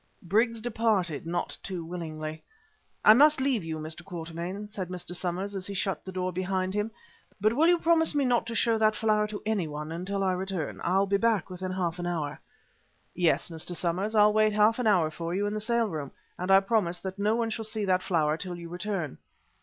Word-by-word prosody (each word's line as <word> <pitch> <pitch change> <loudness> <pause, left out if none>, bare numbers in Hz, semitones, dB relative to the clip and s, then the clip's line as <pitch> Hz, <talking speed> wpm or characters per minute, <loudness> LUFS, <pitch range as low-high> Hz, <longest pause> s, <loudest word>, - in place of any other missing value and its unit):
Briggs 225 +5 +1
departed 215 - 0
not 175 +1 -2
too 180 -4 -5
willingly. 155 -2 -5 0.6
"I 215 - +10
must 295 +4 +6
leave 260 -7 +1
you, 160 -1 -4
Mr. 155 +1 -6
Quatermain," 175 +3 -6
said 190 -4 -5
Mr. 180 -1 -6
Somers 185 +3 -3
as 185 -1 -4
he 200 - -5
shut 195 -3 -1
the 190 - -7
door 185 0 -2
behind 185 +1 -1
him. 210 +2 -1 0.5
"But 215 +3 +3
will 305 +7 +4
you 350 0 +5
promise 325 -2 +3
me 285 -2 +2
not 240 -2 +2
to 230 - -4
show 225 0 +2
that 215 0 +3
flower 215 -1 +2
to 210 -1 -7
anyone 160 -8 -2
until 190 +4 -2
I 190 - +2
return? 185 -3 -3
I'll 190 +3 +3
be 200 0 +2
back 220 -4 +1
within 185 0 -4
half 180 -2 -2
an 175 - -2
hour." 155 -4 -3 0.7
"Yes, 175 -1 +1
Mr. 165 +2 -4
Somers. 185 +6 -1
I'll 210 0 +6
wait 215 0 +3
half 215 +3 +4
an 245 - +1
hour 175 -7 +3
for 170 +2 -4
you 200 +2 0
in 205 - -1
the 215 - -2
sale 235 +1 +2
room, 155 -7 -4 0.3
and 180 +1 -4
I 195 0 +7
promise 195 -4 +1
that 190 +2 -6
no 210 +2 +2
one 230 -1 0
shall 225 0 -3
see 215 -1 -2
that 185 -1 +2
flower 155 -4 +1
till 180 0 -3
you 170 -1 -8
return." 175 -4 -3
190 Hz, 215 wpm, -28 LUFS, 175-215 Hz, 0.7 s, I